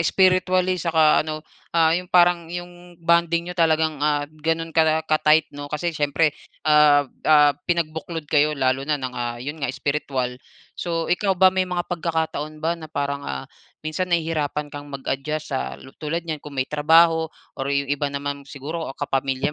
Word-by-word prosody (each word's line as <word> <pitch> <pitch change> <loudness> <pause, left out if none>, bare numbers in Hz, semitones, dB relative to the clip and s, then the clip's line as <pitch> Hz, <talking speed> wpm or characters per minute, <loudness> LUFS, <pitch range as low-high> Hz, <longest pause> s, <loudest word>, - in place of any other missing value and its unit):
spiritually 185 0 +2
saka 160 -2 +4
ano, 155 0 -5 0.3
ah, 160 -1 +5
yung 180 +1 -2
parang 175 -2 +4
yung 175 0 -9
bonding 170 0 +2
niyo 180 - -5
talagang 160 -3 +1
ah, 145 -1 +1
ganun 160 +2 -3
kala 160 0 +3
ka-tight, 155 0 +3
'no? 145 0 -7
Kasi 165 +3 -2
siyempre, 150 +1 +1 0.3
ah, 150 -1 +5 0.2
ah, 150 -1 +6 0.2
pinagbuklod 165 -1 -2
kayo 150 0 +2
lalo 135 +2 0
na 150 - +2
ng, 130 -2 -5
ah, 120 -1 -3
yun 145 +6 -6
nga 140 - -1
spiritual. 135 -2 -2 0.4
So 165 -1 -2
ikaw 190 0 +1
ba 185 0 +6
may 185 -1 0
mga 175 -1 -2
pagkakataon 160 -3 -3
ba 165 - +2
na 160 -2 -8
parang 140 -1 -2
ah, 65 - -5 0.4
minsan 180 +4 -2
nahihirapan 155 -3 -1
kang 145 0 -8
mag-adjust 140 +2 -4
sa 65 +1 -3 0.2
tulad 165 +3 -3
niyan, 155 -3 -4
kung 145 -2 -10
may 130 - +1
trabaho 160 +2 +4 0.2
or 135 +1 -4
yung 140 0 +1
iba 145 0 -1
naman 140 0 -5
siguro 155 +4 -5
kapamilya 135 +1 -1
155 Hz, 165 wpm, -23 LUFS, 145-170 Hz, 0.4 s, ah